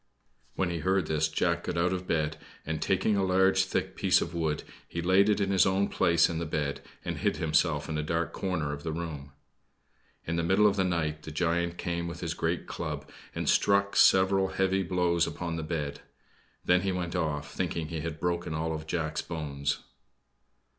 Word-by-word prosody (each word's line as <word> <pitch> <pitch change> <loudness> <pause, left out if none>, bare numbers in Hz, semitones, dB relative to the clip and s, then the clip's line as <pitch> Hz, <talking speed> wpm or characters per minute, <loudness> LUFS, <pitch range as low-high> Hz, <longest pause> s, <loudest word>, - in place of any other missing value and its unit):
When 95 -2 0
he 85 - -2
heard 95 +1 +1
this, 80 0 +1
Jack 85 +2 0
got 85 - -2
out 90 +2 +2
of 90 0 -4
bed, 80 -1 0 0.3
and, 80 +1 -3
taking 95 +3 +2
a 100 - +2
large, 95 +1 +3
thick 95 - -2
piece - - +4
of - - -4
wood, 80 -3 -1 0.2
he 85 - -5
laid 95 +4 +4
it 105 -1 +2
in 100 -1 +1
his 95 -3 +5
own 95 +1 +1
place 85 -1 +4
in 80 -1 -3
the 85 - -3
bed, 75 -2 -2 0.2
and - - -3
hid - - 0
himself 75 -1 +1
in 75 -1 -2
a - - +1
dark 85 +2 -1
corner 80 -7 -2
of 75 - -6
the 80 - -3
room. 80 -4 -5 0.9
In 85 +1 -2
the 85 - +1
middle 95 +5 +4
of 100 -1 +4
the 95 - +2
night, 80 -4 -1
the - - -8
giant 85 +2 0
came 85 -1 -2
with 85 0 -7
his 85 -2 -2
great 85 +1 -1
club, - - -5 0.3
and - - -3
struck 100 0 +3
several 95 0 +5
heavy 95 0 +1
blows 85 -1 +1
upon 85 -1 -4
the 80 - -3
bed. 75 -3 -3 0.6
Then 90 0 +4
he 95 0 0
went 90 -1 -3
off, 75 -4 -2
thinking 85 -3 -2
he 85 -1 -3
had 80 -1 -5
broken 85 -2 -1
all 80 +1 -1
Jack's 80 0 -2
bones. 70 -3 -3
85 Hz, 200 wpm, -29 LUFS, 80-95 Hz, 0.9 s, his